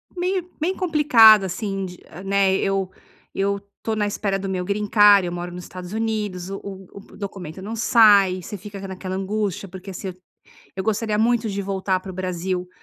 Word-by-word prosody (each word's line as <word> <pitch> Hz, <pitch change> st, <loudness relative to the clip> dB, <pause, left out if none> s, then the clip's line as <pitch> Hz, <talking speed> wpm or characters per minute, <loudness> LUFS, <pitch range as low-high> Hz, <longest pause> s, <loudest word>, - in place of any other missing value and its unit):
meio 360 Hz, 0 st, -1 dB
bem 350 Hz, +5 st, 0 dB
complicada, 255 Hz, -, +6 dB
assim, 195 Hz, +1 st, -3 dB
de, 180 Hz, -1 st, -9 dB, 0.3 s
né, 195 Hz, -1 st, +3 dB
eu 195 Hz, -1 st, 0 dB, 0.5 s
eu 200 Hz, +1 st, 0 dB, 0.2 s
estou 225 Hz, -, -3 dB
na 210 Hz, -1 st, 0 dB
espera 200 Hz, -1 st, -1 dB
do 195 Hz, 0 st, -4 dB
meu 185 Hz, -1 st, -2 dB
greencard, 205 Hz, 0 st, +5 dB
eu -, -, -3 dB
moro 175 Hz, 0 st, -5 dB
no 175 Hz, -, -7 dB
Estados 180 Hz, +1 st, -9 dB
Unidos, 210 Hz, -5 st, -2 dB
o 195 Hz, -, -5 dB
o 190 Hz, -2 st, -8 dB, 0.3 s
o -, -, -13 dB
documento 190 Hz, -4 st, -7 dB
não 215 Hz, +4 st, -5 dB
sai, 205 Hz, -5 st, +5 dB
você 205 Hz, +4 st, -7 dB
fica 200 Hz, +1 st, -9 dB
ca 195 Hz, -, -6 dB
naquela 185 Hz, 0 st, -5 dB
angústia, 200 Hz, 0 st, -2 dB
porque, 190 Hz, +1 st, -9 dB
assim, 185 Hz, 0 st, -6 dB, 0.6 s
eu 190 Hz, -, -3 dB
gostaria 215 Hz, 0 st, 0 dB
muito 230 Hz, 0 st, +2 dB
de 200 Hz, -1 st, -3 dB
voltar 190 Hz, -1 st, -1 dB
para 190 Hz, 0 st, -8 dB
o -, -, -9 dB
Brasil 180 Hz, 0 st, -3 dB
195 Hz, 185 wpm, -22 LUFS, 185-215 Hz, 0.6 s, complicada